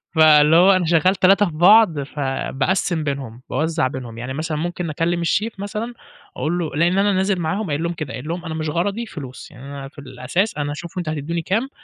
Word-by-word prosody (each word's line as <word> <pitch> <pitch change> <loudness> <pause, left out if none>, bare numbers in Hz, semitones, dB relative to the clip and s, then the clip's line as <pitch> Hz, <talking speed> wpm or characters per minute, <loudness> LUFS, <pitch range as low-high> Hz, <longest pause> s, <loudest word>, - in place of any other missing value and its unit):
فاللي 155 -1 +6
هو 185 +4 +7
أنا 185 -2 +2
شغال 170 +3 +3
3 195 +2 +4
في 175 - -4
بعض، 180 -3 +6
فباقسّم 145 +4 -1
بينهم، 135 -5 -5
باوزّع 155 0 0
بينهم 125 -3 -7
يعني، 125 +2 -5
مثلًا 155 +2 -3
ممكن 175 +1 -3
أكلّم 170 +3 -1
الChef 210 +4 -1
مثلًا، 210 +4 -4 0.4
أقُول 175 +3 -1
له 160 -4 -3
لإن 170 +4 +2
أنا 200 0 +3
نازل 190 0 +1
معاهم، 175 +5 -2
قايل 150 +2 -2
لهم 170 0 -1
كده، 155 -5 -6
قايل 130 +4 -7
لهم 170 +1 -4
أنا 160 - -4
مش 155 -1 -3
غرضي 200 +9 -1
فلوس 135 - -9
يعني، 125 - -13
أنا 140 -1 -7
في 140 +1 -15
الأساس 175 - -2
أنا 145 0 -2
شوفوا 170 +5 -7
أنتم 155 -3 -4
هتدّوني 155 +3 -3
كام، 220 +10 -1
165 Hz, 210 wpm, -21 LUFS, 145-185 Hz, 0.4 s, هو